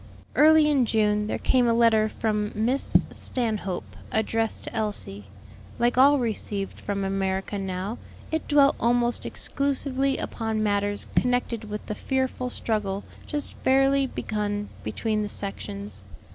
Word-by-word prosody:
Early 310 0 +6
in 275 -5 +3
June 210 -1 +2
there - - -1
came 250 -2 +2
a 230 - +3
letter 225 -2 +4
from 210 -1 -1
Miss 240 +6 +2
Stanhope, 215 -7 -3 0.2
addressed 225 +1 0
to - - -6
Elsie. 205 - -2 0.5
Like 240 +1 +2
all 280 +3 +6
received 210 -5 -2
from 200 -1 -3
America 195 +1 -1
now, 190 +4 -4 0.3
it 320 0 -2
dwelt 285 -2 +5
almost 240 0 +1
exclusively 275 -1 0
upon 220 -2 -2
matters 205 -1 +2
connected 245 -2 +1
with 210 0 -6
the - - -3
fearful 260 +1 -2
struggle 205 -5 -2 0.2
just 295 -1 -3
fairly 270 +1 +3
begun 210 -3 -3
between 215 -2 -1
the 210 - -2
sections. 100 - -5
220 Hz, 130 wpm, -26 LUFS, 205-255 Hz, 0.5 s, Early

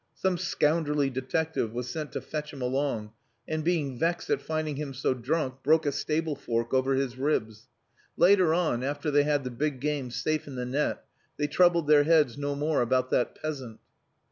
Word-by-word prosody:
Some 185 -2 0
scoundrelly 150 -4 +1
detective 130 -1 -2
was 125 0 -4
sent 155 -2 -5
to - - -3
fetch 150 -1 -5
him 135 - -8
along, 125 -4 -1 0.4
and 155 0 -2
being 150 -7 0
vexed 170 +1 0
at - - +1
finding 155 -2 -2
him 140 -2 -5
so 130 0 +1
drunk 130 +1 -2
broke 155 +3 +3
a 145 - +2
stable 155 +2 -1
fork 115 -3 -2
over 130 +1 +2
his 130 -2 -2
ribs. 110 -6 -1 0.5
Later 180 -1 +5
on, 160 -8 +1
after 145 +2 -2
they 145 0 +5
had 145 -2 +1
the 125 - -4
big 140 +2 -2
game 145 -2 -2
safe 155 +5 -2
in 140 - -7
the 125 -1 -3
net, 140 +4 -1 0.3
they 150 - 0
troubled 170 +2 +3
their 145 -1 +5
heads 150 -7 +4
no 145 0 -2
more 150 0 +1
about 130 +1 +1
that 125 - +1
peasant." 135 -8 -5
145 Hz, 190 wpm, -28 LUFS, 130-155 Hz, 0.5 s, Later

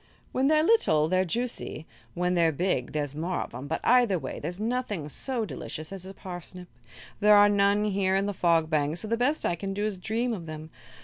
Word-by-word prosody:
"When 265 +1 +1
they're 310 +1 +4
little, 235 - +3
they're 185 +2 +2
juicy; 230 -5 -3 0.3
when 180 +1 0
they're 170 -2 +3
big, 150 -5 -1
there's 145 -2 -2
more 170 +5 -2
of - - -7
'em; 130 +4 -7
but 160 - -2
either 240 -6 +4
way - - -6
there's 175 +5 -4
nothing 220 - -2
so 240 - -2
delicious 155 -5 -6
as 190 -1 -6
a 195 - -8
parsnip. 180 -1 -8 0.5
There 210 0 +6
are 205 0 +7
none 205 0 +3
here 190 -2 +1
in 195 +1 +1
the 205 - -2
Fog 170 -3 +2
Bank, 155 0 0
so 215 - -2
the 230 - +1
best 255 +6 0
I - - +1
can 195 +3 -4
do 205 +1 -1
is 205 -4 -3
dream 230 +5 -1
of 175 -6 -6
them. 155 0 -8
190 Hz, 220 wpm, -27 LUFS, 160-215 Hz, 0.5 s, are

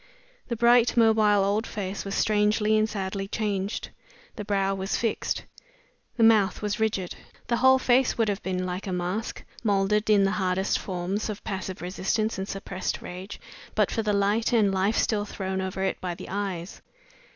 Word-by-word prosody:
The 235 - -2
bright, 235 +1 +4
mobile 215 -3 +5
old 205 +3 0
face 195 -1 -4
was 195 - -3
strangely 210 0 +2
and 215 0 +2
sadly 195 -1 -3
changed. 205 -1 -2 0.5
The 210 - -5
brow 195 -1 0
was 195 +1 -2
fixed; 230 -2 -1 0.7
the 230 - +3
mouth 215 -3 +4
was 210 0 -1
rigid; 205 -5 -1 0.4
the 235 - +2
whole 260 +1 +6
face 255 0 +2
would 225 -2 +2
have 205 0 -1
been 185 -1 -2
like 185 +2 -4
a - - -2
mask, 180 +5 -3 0.2
molded 210 0 +1
in 205 -2 +5
the 195 - +2
hardest 190 -1 0
forms 190 +3 -3
of 210 - -6
passive 190 -3 -5
resistance 195 +4 -1
and 190 - -3
suppressed 195 -1 -4
rage, 185 +3 -8 0.4
but 210 -2 +2
for 225 - 0
the 215 -1 0
light 205 +3 +1
and 210 -4 +3
life 195 +4 +1
still 210 -2 +1
thrown 190 -2 -3
over 190 0 -3
it 190 - -1
by 180 -2 -3
the - - -9
eyes. 190 -2 -4
200 Hz, 175 wpm, -26 LUFS, 190-215 Hz, 0.7 s, whole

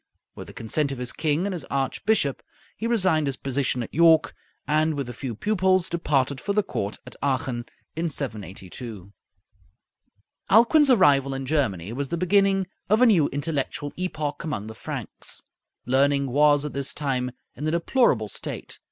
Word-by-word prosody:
With - - -9
the - - -11
consent 140 +6 -1
of 135 - -4
his 125 0 -3
king 155 +3 0
and 200 - -2
his 170 -5 -4
archbishop 140 +3 0 0.3
he 230 - -3
resigned 185 -10 +2
his 135 -1 -2
position 130 -2 -1
at - - -10
York, 165 0 +5 0.3
and 155 +1 +2
with 140 -3 -3
a 120 - -6
few 120 -1 -5
pupils 190 - +2
departed 140 -5 0
for 200 - -1
the 210 0 +2
court 100 - -3
at - - -10
Aachen, 130 -3 -1 0.3
in 165 +1 -1
782. 105 - -6 1.4
Alcuin's 245 - +6
arrival 140 - +4
in 135 0 -4
Germany 115 - -1
was 135 +2 -3
the 170 - -2
beginning 195 +2 +3 0.2
of 220 +4 +4
a - - +8
new 185 -11 +5
intellectual 145 0 -3
epoch 155 -5 -3
among 150 -11 -3
the 110 - -7
Franks. 110 - -7 0.4
Learning 140 +2 +3
was 145 +1 +4
at 150 - -5
this 140 0 -3
time 130 -4 -1 0.3
in 150 - -4
a - - +2
deplorable 170 - +2
state. - - -6
145 Hz, 165 wpm, -25 LUFS, 130-170 Hz, 1.4 s, a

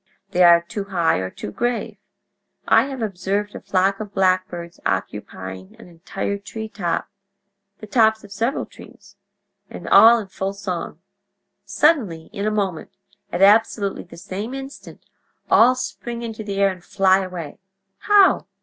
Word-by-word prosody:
They 180 - +1
are 170 -1 +7
too 195 +4 -6
high 175 - +1
or 95 0 -3
too 105 - -8
grave. 240 - -2 0.7
I - - +5
have 265 -4 -5
observed 205 +1 -2
a - - -7
flock 195 +1 +1
of 210 -2 -8
blackbirds 185 -2 0
occupying 95 0 -5
an - - -14
entire 180 +4 -5
treetop—the 200 0 -7
tops 220 0 +2
of 205 - -14
several 230 +7 -2
trees—and - - -16
all 230 +1 +8
in 220 - -4
full 190 +1 -4
song. 180 -4 -5 0.6
Suddenly—in 205 - 0
a - - +3
moment—at 195 -2 -4
absolutely 205 -1 +3
the 170 - -14
same 205 +8 -6
instant—all 270 -2 -1
spring 240 -1 -6
into 225 -2 -6
the 200 -1 -5
air 200 0 +3
and 185 -2 -11
fly 190 -1 +3
away. 180 -6 -7 0.4
How? 410 -2 +4
200 Hz, 130 wpm, -21 LUFS, 185-220 Hz, 0.7 s, all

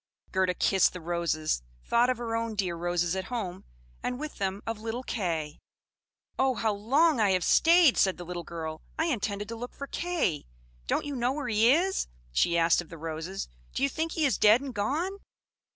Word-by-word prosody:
Gerda 185 -1 +1
kissed 190 +1 +3
the 180 - -6
roses, 165 - -1 0.2
thought 240 +1 +3
of 255 - +1
her 230 -1 -3
own 230 -1 -2
dear 185 -4 -1
roses 175 +1 0
at 190 0 -3
home, 190 -7 -5 0.4
and 250 0 -3
with 305 0 -6
them 195 +1 -2
of 225 -1 -4
little 225 +3 -4
Kay. 165 -11 -3 0.8
"Oh, 265 -1 +3
how 220 -1 0
long 270 +8 +3
I 205 -3 +4
have 185 -1 +1
stayed!" 335 - +5
said 190 -1 +3
the 175 - -7
little 175 0 -5
girl. 160 -2 -6 0.2
"I 320 - +1
intended 205 -8 -2
to 230 - -4
look 245 +2 -7
for 280 - -5
Kay! 330 - -1 0.4
Don't - - 0
you 290 -1 -4
know 245 +1 +1
where 285 -3 -3
he 225 +2 +5
is?" 365 +6 +2 0.2
she 170 - +2
asked 165 +1 +4
of 175 - -13
the 165 - -9
roses. 165 +4 -5 0.3
"Do - - -1
you 275 - +3
think 320 +3 -2
he 315 - +1
is 270 - +1
dead 215 +3 +7
and 270 -1 -6
gone?" 310 - -1
215 Hz, 200 wpm, -28 LUFS, 175-265 Hz, 0.8 s, dead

